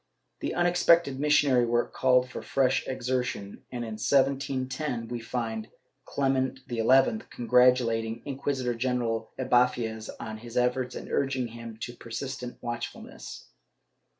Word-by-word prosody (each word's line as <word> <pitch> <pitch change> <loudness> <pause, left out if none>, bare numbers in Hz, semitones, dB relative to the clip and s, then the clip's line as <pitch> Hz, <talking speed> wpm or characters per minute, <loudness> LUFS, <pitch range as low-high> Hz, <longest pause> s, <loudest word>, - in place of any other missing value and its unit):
This - - -2
unex 175 0 +1
pected 165 -6 +5
missionary 145 -4 +4
work 120 +1 0
called 125 -1 +3
for 125 - -7
fresh 135 -1 +1
exertion 125 -5 -2
and, 120 -1 -4
in 110 -1 -6
1710, 135 -2 0
we 120 -1 -3
find 115 -2 -4 0.4
Clement 135 -1 0
XI 115 -2 -1 0.4
congratulating 120 -2 +3
Inquisitor 135 -3 -1
general 115 -2 -1
Ibanez 125 -3 +1
on 110 -1 -6
his 120 +1 -8
efforts 125 +1 +1
and - - -7
urging 135 -3 0
him 115 -1 -9
to 120 - -4
persistent 125 +1 -6
watchfulness. 120 -1 -6
125 Hz, 125 wpm, -28 LUFS, 115-130 Hz, 0.4 s, pected